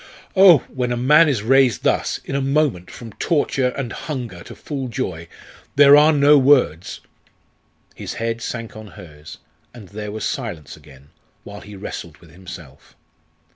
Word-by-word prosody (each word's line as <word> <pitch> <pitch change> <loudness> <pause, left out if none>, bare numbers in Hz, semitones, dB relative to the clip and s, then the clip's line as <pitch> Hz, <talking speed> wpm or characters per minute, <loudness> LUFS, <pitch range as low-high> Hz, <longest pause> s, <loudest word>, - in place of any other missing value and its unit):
"Oh! 185 -7 +7
when 125 -2 -3
a 120 - -1
man 150 +6 +4
is 120 -8 -1
raised 130 +1 +3
thus - - 0
in - - -6
a 140 - -1
moment 135 - -1
from 115 -3 -11
torture 145 -5 0
and 125 -1 -5
hunger 120 - -6
to - - -11
full 135 -3 -6
joy, 90 -10 -5 0.5
there 140 0 +7
are 150 +2 +6
no 145 0 +5
words 130 - +1 0.5
" - - -43 0.3
His - - -8
head 115 0 -3
sank 115 -2 -6
on 110 0 -10
hers, 75 -2 -13 0.4
and 105 -6 -13
there 105 0 -7
was 110 0 -5
silence 75 -5 -5
again, 70 -2 -19 0.3
while 100 0 -11
he 105 0 -12
wrestled 85 -5 -8
with 85 0 -19
himself. 85 -5 -13
115 Hz, 165 wpm, -20 LUFS, 90-140 Hz, 0.5 s, Oh